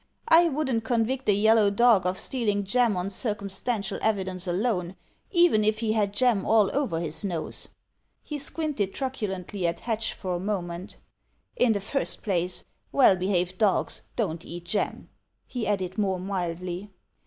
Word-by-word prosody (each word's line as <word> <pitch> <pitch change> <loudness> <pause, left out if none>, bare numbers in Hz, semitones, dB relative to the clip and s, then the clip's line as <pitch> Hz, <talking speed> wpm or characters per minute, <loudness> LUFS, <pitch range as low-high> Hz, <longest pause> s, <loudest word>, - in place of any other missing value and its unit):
"I 335 +1 +7
wouldn't 265 -6 -1
convict 245 +2 0
a - - +6
yellow 215 +1 +5
dog 210 -3 +4
of 185 +1 -1
stealing 210 -5 -1
jam 225 0 +2
on 180 +2 -2
dtcumstantial 200 0 -3
evidence 190 -4 -1
alone, 180 -1 -1 0.3
even 345 - +4
if 215 0 +2
he 220 -1 0
had 210 -2 +1
jam 210 -2 +2
all 215 -3 +3
over 265 - 0
his 160 -1 -2
nose." 175 -5 -3 0.5
He 300 -1 -5
squinted 280 -9 -2
truculently 200 -8 -3
at 170 - -3
Hatch 225 -1 -2
for 185 -2 -3
a 175 - -1
moment. 180 -2 -4 0.6
"In 240 -3 +3
the 200 - -2
first 275 +8 -2
place, 180 -3 -1 0.3
well 255 -8 +6
behaved 185 -1 -1
dogs 205 -4 +1
don't 170 -8 -2
eat 175 0 -8
jam," 205 +4 -2 0.4
he 245 -4 -4
added 190 -2 -1
more 190 -3 +1
mildly. 180 0 -3
205 Hz, 155 wpm, -27 LUFS, 185-230 Hz, 0.6 s, I